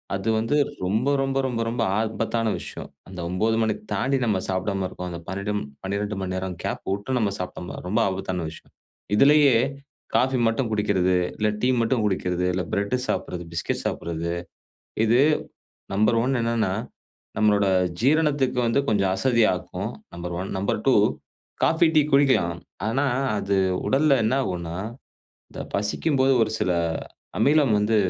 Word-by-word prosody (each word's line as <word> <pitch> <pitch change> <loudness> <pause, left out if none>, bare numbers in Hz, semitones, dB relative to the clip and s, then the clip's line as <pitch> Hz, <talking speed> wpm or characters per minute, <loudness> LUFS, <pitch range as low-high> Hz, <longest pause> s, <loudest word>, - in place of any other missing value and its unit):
அது 100 +3 -2
வந்து 115 +6 0 0.3
ரொம்ப 110 +8 0
ரொம்ப 135 0 -1
ரொம்ப 120 -3 -2
ரொம்ப 115 0 -2 0.2
ஆபத்தான 110 0 -1
விஷயம். - - -8 0.2
அந்த 95 0 -10
9 110 +5 +1
மணி 110 -1 +2 0.2
தாண்டி 135 +7 +1
நம்ம 105 -4 +1
சாப்டாம 95 0 -1
இருக்கோம், 90 -1 -6
அந்த 85 - -6
பன்னென்டும் 100 +2 -2 0.2
12 100 +1 -2
மணி 95 -1 -3
நேரம் 95 -1 -3
கேப் - - -3
விட்டு 100 +6 -1
நம்ம 105 -3 +1
சாப்பிட்டோம்னா 90 -1 -6
ரொம்ப 110 +5 +1
ஆபத்தான 95 -3 -3
விஷயம். - - -15 0.4
இதிலயே 140 +2 +6 0.6
காஃபி 130 +1 +3
மட்டும் 115 +1 0
குடிக்கிறது, 95 -3 +2 0.2
இல்லை 105 0 +1
டீ 125 - +4
மட்டும் 115 0 +1
குடிக்கிறது, 90 -3 0
இல்லை 90 -1 -1
பிரெட்டு 100 +5 0
சாப்பிடுறது, 90 -1 -2
பிஸ்கட் 85 - -2
சாப்பிடுறது 85 0 -3 0.7
இது 120 +3 +4 0.8
நம்பர் 110 +3 +3
ஒன் 130 +1 +1
என்னான்னா 115 -4 0 0.6
நம்மளோட 105 -2 +3 0.3
ஜீரணத்துக்கு 140 -1 +2
வந்து 115 +4 +2
கொஞ்சம் 100 -5 +2
அசதியாக்கும். 100 -4 +1 0.2
நம்பர் 85 0 -5
1, 95 - -4
நம்பர் 100 +1 0
2 - - +5 0.7
காஃபி 165 +1 +4
டீ 155 - +7
குடிக்கலாம். 130 -12 +3 0.3
ஆனா 135 +6 +1 0.3
அது 100 -1 0 0.3
உடல்ல 140 +1 +4
என்னாகுன்னா 90 -9 -1 0.7
இந்த - - -8
பசிக்கும்போது 130 +7 +1
ஒரு 110 - 0
சில 90 - +1 0.7
அமிலம் 145 -4 +4
வந்து 105 +2 +2
105 Hz, 140 wpm, -24 LUFS, 95-125 Hz, 0.8 s, டீ